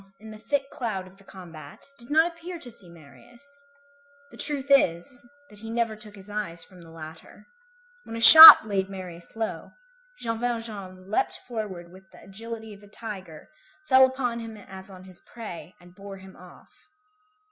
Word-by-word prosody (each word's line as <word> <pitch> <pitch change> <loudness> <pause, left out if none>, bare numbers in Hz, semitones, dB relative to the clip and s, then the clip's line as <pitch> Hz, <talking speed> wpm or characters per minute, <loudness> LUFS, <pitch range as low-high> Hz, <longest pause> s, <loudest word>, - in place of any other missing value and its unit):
Jean 195 - -29
Valjean, 195 +1 -37
in 220 0 -14
the 215 0 -16
thick 280 -1 -3
cloud 215 -7 -7
of 185 +1 -20
the 195 - -23
combat, 165 -7 -15
did 235 - -18
not 315 +2 +1
appear 340 +1 -12
to 255 -7 -14
see 195 -6 -20
Marius; 170 - -13 0.8
the - - -17
truth 280 -2 +1
is, 180 -3 -1 0.3
that 210 - -17
he 225 +1 -12
never 230 -1 -4
took 210 -1 -17
his 195 0 -13
eyes 205 -5 -7
from 185 -2 -19
the 165 - -18
latter. 160 0 -15 0.6
When 225 - -11
a - - -7
shot 320 +2 +11
laid 195 -2 -4
Marius 180 -2 -13
low, 225 -1 -8 0.4
Jean 230 - -7
Valjean 210 -6 -8
leaped - - -3
forward 200 -8 -9
with 190 0 -20
the - - -20
agility 220 +2 -12
of 200 - -18
a 205 - -19
tiger, 195 -7 -13 0.4
fell 260 0 +4
upon 250 -3 -6
him 225 -1 -11
as 190 -1 -15
on 185 -1 -16
his 185 -1 -16
prey, 195 -6 -13
and 175 0 -21
bore 195 +1 -13
him 190 0 -17
off. 180 0 -20
205 Hz, 185 wpm, -23 LUFS, 185-230 Hz, 0.8 s, shot